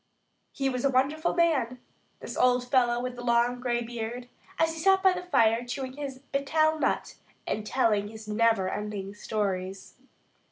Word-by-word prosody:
He 270 - -1
was 250 -2 -2
a 275 - +3
wonderful 280 +5 +1
man, 275 -8 +1 0.4
this - - -6
old 250 0 +3
fellow 240 -2 +3
with 250 0 -4
the 245 - -8
long 240 +1 +2
gray 240 -1 -1
beard, 240 +1 -6 0.3
as 325 0 +2
he 325 - -7
sat 385 +2 +4
by 380 -1 +6
the 360 - -4
fire 230 -10 +3
chewing 260 +1 -5
his 275 -2 -6
"betel" 310 +3 +2
nut - - -1 0.3
and 215 0 -3
telling 210 -5 +2
his 220 0 -10
neverending 210 -2 0
stories. 195 -3 -3
245 Hz, 160 wpm, -28 LUFS, 220-275 Hz, 0.4 s, by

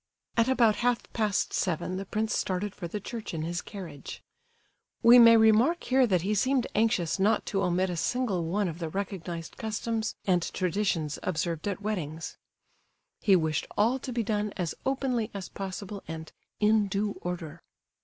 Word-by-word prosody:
At 230 0 +3
about 230 -5 +4
half 245 0 +1
past 210 -3 0
seven 180 0 -1
the 195 0 -5
prince 215 +2 -1
started 190 +2 -1
for 175 - -6
the 210 +5 -4
church 220 -3 -6
in 155 - -3
his 170 +2 -2
carriage. 170 -9 -9 0.8
We 240 +2 +9
may 230 -1 +9
remark 225 +10 +4
here 260 -1 +3
that 180 -5 +1
he 205 +3 0
seemed 255 +4 +2
anxious 200 -6 +1
not 205 +3 +2
to 195 - -1
omit 180 0 +1
a - - -3
single 200 -2 0
one 195 +4 0
of 165 0 -5
the 165 -2 -3
recognized 175 -3 -5
customs 220 -1 -2
and 180 -2 +3
traditions 180 -4 -1
observed 165 -1 -2
at 200 0 -3
weddings. 165 -7 -4 0.8
He 200 -3 +4
wished 160 -4 0
all 235 +6 +3
to 260 - -6
be 235 -1 -1
done 210 -1 -1
as 175 -4 -2
openly 260 -4 0
as 195 -2 -5
possible, 195 +1 -6
and 160 -1 -7 0.3
"in 210 0 +4
due 200 +1 -2
order." 175 -3 -5
200 Hz, 170 wpm, -28 LUFS, 175-220 Hz, 0.8 s, We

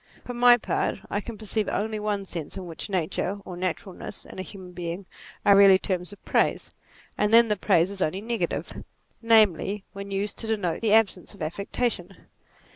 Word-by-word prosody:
For 245 - -5
my 245 0 +6
part - - -1
I 205 - 0
can 230 0 -8
perceive 215 0 -2
only 215 +1 -1
one 205 -2 -2
sense 170 -5 -7
in 190 - -5
which 165 +4 -7
nature, 185 +2 -1
or 180 - -7
naturalness, 185 +1 -5
in - - -10
a - - -1
human 185 -1 -10
being, 175 +2 -5 0.4
are 200 - +7
really 195 -1 +8
terms 185 -1 -3
of 205 - -15
praise; - - +1 0.5
and 210 0 +2
then 230 0 +7
the 210 - +2
praise 185 -2 +2
is 200 -1 -7
only 185 +4 0
negative: 230 +1 -3 0.4
namely 210 -3 +3
when 200 0 -7
used 200 +1 -2
to 225 - -3
denote 200 -7 -1
the 230 - 0
NATURE 215 +1 +7
61 - - +10
absence 195 -4 -4
of 195 - -16
affectation. 195 +2 -2
200 Hz, 195 wpm, -26 LUFS, 185-215 Hz, 0.5 s, 61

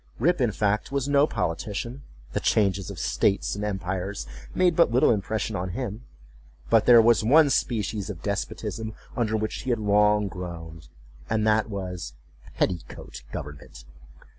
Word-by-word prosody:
Rip, 170 +4 +2
in 120 -3 +2
fact, 105 +4 0
was 140 -1 -1
no 145 +1 +4
politician; 105 - -3 0.3
the - - 0
changes 100 -3 +1
of - - -7
states 100 -1 +1
and 100 - -4
empires 95 -1 -3 0.3
made 180 -2 +3
but 170 - +5
little 120 +2 +4
impression 110 0 -1
on 95 -1 -3
him; 120 -2 -5 0.7
but 115 -2 +4
there 120 -2 +9
was 115 -2 +4
one 145 +5 +5
species 105 -4 -1
of 85 -5 -7
despotism 110 +2 -4 0.2
under 110 -3 0
which 110 0 -3
he 130 - -5
had 120 - +2
long 105 0 +3
groaned, 85 -4 -8 0.4
and 110 -1 +1
that 110 0 +2
was—petticoat 90 - -5
government. 70 -4 -8
105 Hz, 145 wpm, -26 LUFS, 95-115 Hz, 0.7 s, there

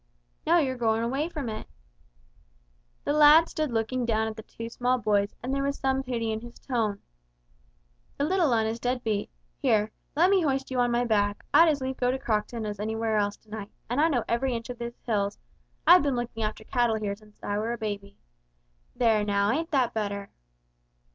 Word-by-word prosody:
"No, 340 +2 +5
you're 265 -6 +1
goin' 225 -1 +1
away 270 +7 -1
from 295 -7 -5
it." 215 -1 -5 1.4
The 290 - 0
lad 300 +2 +7
stood 310 -2 -2
looking 230 +3 -1
down 220 -1 +1
at 220 - -5
the 220 - -8
two 230 +1 -8
small 250 +2 0
boys 205 -3 +1
and 255 +2 -2
there 275 - 0
was 280 0 -1
some 265 0 0
pity 235 -4 -2
in 220 0 -3
his 240 0 -11
tone. 220 -6 -2 1.1
"The - - 0
little 335 -2 +2
'un 225 -2 +2
is 225 +1 -2
dead 250 +1 -1
beat. 215 -2 -1 0.3
Here 215 0 +2 0.2
let 350 +5 +4
me 390 -2 +4
hoist 270 -4 -1
you 255 - 0
on 245 0 +3
my 240 +1 +1
back, 205 -2 0
I'd 335 0 +7
as 290 -3 0
lief 260 0 -3
go 245 - +1
to 260 - 0
Crockton 220 -2 -2
as 205 -1 -5
anywhere 220 +1 -1
else 205 0 0
to 215 - -28
night, 210 -2 -6 0.2
and 260 +4 +2
I 320 - +5
know 245 -7 +1
every 245 +2 0
inch 230 +2 -5
of 245 - -9
these 235 0 -5
hills, 205 -4 0 0.5
I've 360 +1 +8
been 280 -3 0
looking 240 -2 -4
after 215 0 -3
cattle 240 -1 +1
here 210 -2 -2
since 210 0 -21
I 205 0 -1
were 225 +2 -1
a - - -4
babby! 205 -2 -5 0.8
There 225 -3 +3
now, 200 0 +2
ain't 325 +5 -1
that 260 -6 +1
better?" 200 -2 -3
235 Hz, 205 wpm, -27 LUFS, 215-265 Hz, 1.4 s, I've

